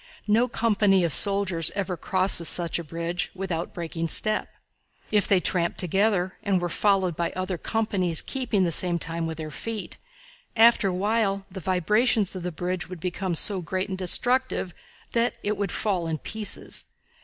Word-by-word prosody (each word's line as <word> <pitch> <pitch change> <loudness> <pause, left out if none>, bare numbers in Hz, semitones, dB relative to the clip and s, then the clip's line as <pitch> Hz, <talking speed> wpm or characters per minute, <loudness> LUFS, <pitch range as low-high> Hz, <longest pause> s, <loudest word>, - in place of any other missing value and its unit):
No 225 +4 +3
company 205 -5 +2
of 165 -4 +3
soldiers 195 -5 +4
ever 195 -2 -2
crosses 185 -1 +4
such 170 -1 +2
a - - -5
bridge 170 +3 -3
without 180 -3 -4
breaking 165 -1 -4
step. 215 +6 -1 0.6
If 210 -2 +2
they 195 - +4
tramped 175 -1 0
together, 190 +1 +1
and 200 -3 +1
were 175 0 -2
followed 190 -2 +1
by 170 +1 -2
other 185 -1 -3
companies 195 -7 0
keeping 240 -7 -1
the 170 - 0
same 175 +2 +2
time 165 0 -3
with 160 -1 -5
their 155 -1 -6
feet, 225 +6 -5 0.6
after 230 -2 +5
a - - 0
while 200 0 0
the 190 - -7
vibrations 200 +4 +1
of 185 - -5
the 180 +1 -4
bridge 175 +1 -4
would 185 -2 -8
become 180 +1 -3
so 190 +3 +1
great 185 +3 -3
and 190 - -4
destructive 245 +1 +1 0.4
that 235 +1 +1
it 210 +1 0
would 200 -3 -2
fall 185 -6 -1
in 160 -1 -2
pieces. 215 +4 -3
185 Hz, 170 wpm, -25 LUFS, 170-210 Hz, 0.6 s, after